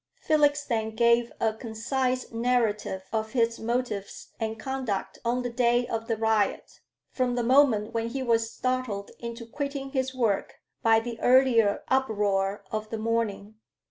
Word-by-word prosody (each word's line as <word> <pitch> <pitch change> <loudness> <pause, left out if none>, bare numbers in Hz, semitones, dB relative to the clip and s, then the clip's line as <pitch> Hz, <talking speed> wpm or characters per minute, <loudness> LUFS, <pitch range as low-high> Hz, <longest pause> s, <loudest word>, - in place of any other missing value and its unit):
Felix 290 -2 +2
then 220 -3 -2
gave 235 +1 +3
a 220 -1 +1
concise 250 +3 -2
narrative 225 -5 0
of 220 +1 -2
his 230 -2 +1
motives 230 -3 -3
and 225 -1 -3
conduct 260 -6 -3
on 245 +1 0
the 245 - -2
day 240 0 +2
of 225 -1 -4
the 225 - 0
riot, 220 -2 0 0.3
from 250 -2 0
the 240 - 0
moment 230 -4 +4
when 230 0 -1
he 260 +3 -3
was 230 -2 +2
startled 255 -6 -2
into 235 0 -6
quitting 280 +2 -4
his 260 -1 -1
work 225 -6 0 0.3
by 225 -1 +5
the 230 0 -6
earlier 245 -5 +4
uproar 205 -6 +1
of 215 0 -3
the 225 - -3
morning. 220 -2 -2
230 Hz, 150 wpm, -27 LUFS, 220-255 Hz, 0.3 s, by